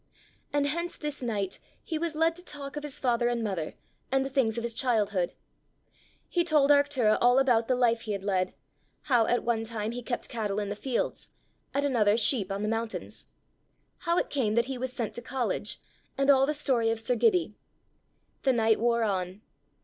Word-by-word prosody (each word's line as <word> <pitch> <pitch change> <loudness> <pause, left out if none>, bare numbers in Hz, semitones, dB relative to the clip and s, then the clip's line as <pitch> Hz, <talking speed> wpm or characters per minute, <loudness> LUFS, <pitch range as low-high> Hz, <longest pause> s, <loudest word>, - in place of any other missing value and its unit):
And 290 0 +1
hence 340 +4 -2
this 295 -2 -4
night 205 -6 -2 0.2
he 320 -2 -3
was 330 -1 -2
led 325 +1 +2
to 355 - -12
talk 285 -4 -7
of 295 - -3
his 295 -2 -5
father 240 -2 +2
and 240 -1 0
mother, 185 -7 -3 0.4
and 270 0 +2
the 270 - -5
things 240 -5 +1
of 235 - -2
his 235 -1 -2
childhood. 210 -7 +1 0.9
He 345 - +1
told 300 -4 +4
Arctura 285 -6 +4
all 245 +1 +5
about 245 -4 +3
the 255 - +2
life 235 -2 +2
he 215 -2 -3
had 195 -1 -4
led; 185 -2 0 0.5
how 245 -5 +3
at 245 - +1
one 230 -1 0
time 220 -1 -3
he 245 +1 -5
kept 240 0 -3
cattle 210 -3 -2
in 205 -1 -3
the 205 - -3
fields, 250 +3 -2 0.4
at 280 +1 0
another 220 -6 +3
sheep 215 -3 +1
on 200 +1 -2
the - - 0
mountains; 225 0 -4 0.7
how 340 +1 0
it - - 0
came 225 -7 +1
that 235 0 +3
he 265 +1 -4
was 260 0 -2
sent 235 -4 -3
to 240 - -5
college, 250 +1 -2 0.4
and 275 +1 +5
all 270 0 +4
the 300 - 0
story 250 -6 +1
of 225 0 0
sir 230 +2 0
Gibbie. 365 - +2 0.9
The 265 - +3
night 225 -2 +3
wore 235 0 +2
on. 190 -1 -2
240 Hz, 200 wpm, -28 LUFS, 220-275 Hz, 0.9 s, all